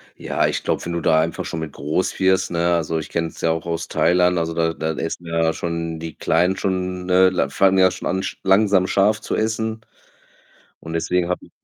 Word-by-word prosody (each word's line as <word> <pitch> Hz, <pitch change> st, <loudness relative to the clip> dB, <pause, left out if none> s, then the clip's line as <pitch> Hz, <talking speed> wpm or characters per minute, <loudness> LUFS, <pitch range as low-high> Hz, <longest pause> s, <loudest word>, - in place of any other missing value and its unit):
Ja, -, -, 0 dB
ich -, -, -2 dB
glaube, -, -, -1 dB
wenn 85 Hz, -, -3 dB
du 85 Hz, -, -2 dB
da 80 Hz, 0 st, +3 dB
einfach 80 Hz, +1 st, -2 dB
schon 80 Hz, -, -4 dB
mit 80 Hz, -2 st, -6 dB
groß 75 Hz, +6 st, -2 dB
wirst, 95 Hz, 0 st, +2 dB
ne? 85 Hz, 0 st, +1 dB
Also, 80 Hz, -1 st, -1 dB
ich -, -, -7 dB
kenne 85 Hz, 0 st, -1 dB
es -, -, -12 dB
ja 80 Hz, -, +2 dB
auch 80 Hz, +1 st, -3 dB
aus 85 Hz, 0 st, -3 dB
Thailand, 90 Hz, +1 st, +2 dB
also, 80 Hz, 0 st, -1 dB
da 80 Hz, 0 st, 0 dB
da 80 Hz, 0 st, -2 dB
essen 80 Hz, +2 st, -4 dB
ja 80 Hz, -1 st, +1 dB
schon 85 Hz, -1 st, -4 dB
die 80 Hz, -1 st, -7 dB
Kleinen 90 Hz, +3 st, +1 dB
schon, 90 Hz, -1 st, -2 dB
ne 95 Hz, +1 st, +5 dB
l -, -, +1 dB
fangen 95 Hz, 0 st, +3 dB
ja 95 Hz, -1 st, +5 dB
schon 95 Hz, -, -5 dB
an, 95 Hz, +2 st, -1 dB
sch -, -, -5 dB
langsam 95 Hz, -1 st, +3 dB
scharf 105 Hz, +3 st, +2 dB
zu -, -, -3 dB
essen 110 Hz, 0 st, -2 dB, 1.0 s
und 80 Hz, -, -8 dB
deswegen 85 Hz, +1 st, 0 dB
habe 90 Hz, -, -3 dB
ich -, -, -21 dB
85 Hz, 225 wpm, -21 LUFS, 80-95 Hz, 1.0 s, ne